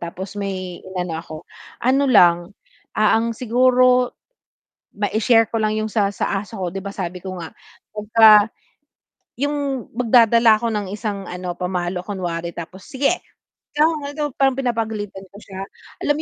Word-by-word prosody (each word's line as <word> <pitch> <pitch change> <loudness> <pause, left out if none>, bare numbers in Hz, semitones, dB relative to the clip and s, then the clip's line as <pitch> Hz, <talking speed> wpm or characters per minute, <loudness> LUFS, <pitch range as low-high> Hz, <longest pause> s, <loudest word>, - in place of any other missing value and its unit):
tapos 185 +4 -7
may 190 -3 -5
inano 180 -3 -4
ako. 160 -1 -10 0.5
Ano 265 +3 +2
lang, 175 -4 +5 0.4
ah, 215 0 +4
ang 230 0 -1
siguro 250 +1 +3 0.8
mai-share 220 +3 +2
ko 225 - -1
lang 215 0 +1
'yong 215 0 -2
sa 205 -2 +1
sa - - -2
aso 210 - -13
ko. 185 -2 -2
'Di - - -3
ba, 200 - -4
sabi 180 -2 -4
ko 190 -1 -6
nga 165 - -7 0.4
'pagka 215 0 +6 0.9
'yong 285 -3 -2
magdadala 230 -1 +5
ako 235 - 0
ng 205 -2 -2
isang 205 -2 -4
ano, 180 0 -5
pamalo 180 0 -2
kunwari. 175 -4 -4
Tapos, 180 +3 -8
"Sige! 275 +5 +1 0.6
Ikaw 300 +1 +5
maldo" 290 +1 -3
parang 270 -1 +4
pinapagalitan 220 -6 -3
ko 200 - -14
siya. 190 -2 -9 0.4
Alam 290 - +2
mo - - -3
210 Hz, 150 wpm, -21 LUFS, 185-245 Hz, 0.9 s, pagka